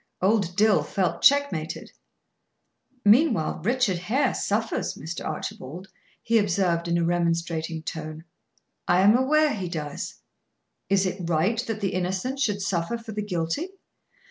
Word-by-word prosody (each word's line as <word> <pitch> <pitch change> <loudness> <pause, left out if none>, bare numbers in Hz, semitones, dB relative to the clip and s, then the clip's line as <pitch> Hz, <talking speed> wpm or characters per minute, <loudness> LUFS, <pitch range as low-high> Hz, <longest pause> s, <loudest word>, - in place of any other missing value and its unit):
Old 190 -2 +1
Dill 215 0 +4
felt 190 -3 -1
checkmated. 280 - +2 1.1
"Meanwhile 220 - +4
Richard 225 -5 +1
Hare 255 +9 +1
suffers, 220 +2 -1
Mr. 160 +3 -6
Archibald," 155 +3 -6 0.3
he 230 0 +3
observed, 180 -4 +1
in 170 0 +1
a 170 - +1
remonstrating 165 -1 -1
tone. 155 0 -6 0.6
"I 180 +1 +4
am 205 +4 +6
aware 295 +4 +3
he 185 -4 -4
does." 150 -4 -5 0.7
"Is 195 -1 +3
it 185 -2 -3
right 180 +8 +2
that 220 -1 -3
the 195 - -1
innocent 185 +9 -2
should 205 -7 0
suffer 185 +4 -1
for 230 -1 -9
the 210 0 -3
guilty?" 185 - -2
190 Hz, 135 wpm, -25 LUFS, 170-225 Hz, 1.1 s, am